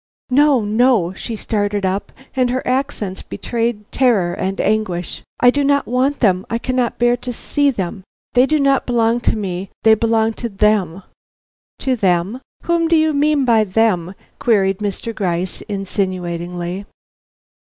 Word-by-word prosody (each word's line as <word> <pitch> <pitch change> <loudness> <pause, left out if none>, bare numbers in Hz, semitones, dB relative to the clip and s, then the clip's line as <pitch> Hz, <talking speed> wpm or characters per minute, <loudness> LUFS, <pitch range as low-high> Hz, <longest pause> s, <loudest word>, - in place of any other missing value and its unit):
"No! 275 -4 +4
no!" 215 -4 +2
She 225 +4 -6
started 205 -2 -1
up, 190 +2 -2 0.2
and 255 -2 +2
her 255 +1 -2
accents 250 -7 -2
betrayed 230 -2 -3
terror 215 -10 +2
and 190 +2 -3
anguish, 195 -5 -1 0.2
"I 245 - +6
do 285 +2 0
not 280 0 +2
want 260 +4 0
them; 190 -5 +3
I 230 - 0
cannot 255 0 -1
bear 240 0 +3
to 250 0 -5
see 285 +4 0
them; 190 -5 -4 0.3
they 250 +2 +5
do 310 +1 +2
not 275 -1 +2
belong 235 -1 +2
to 235 - 0
me; 190 -2 -4
they 220 - +7
belong 225 0 +2
to 235 - -2
them." 195 -3 +1 0.8
"To 260 -2 +1
them? 195 +3 0 0.2
Whom 340 -1 +1
do 335 - +3
you 315 -1 +3
mean 295 -1 +2
by 225 -3 +4
them?" 190 -3 0 0.2
queried 195 -5 +2
Mr. 210 +2 -4
Gryce, 180 -3 -2
insinuatingly. 180 -2 -3
220 Hz, 155 wpm, -18 LUFS, 190-250 Hz, 0.8 s, they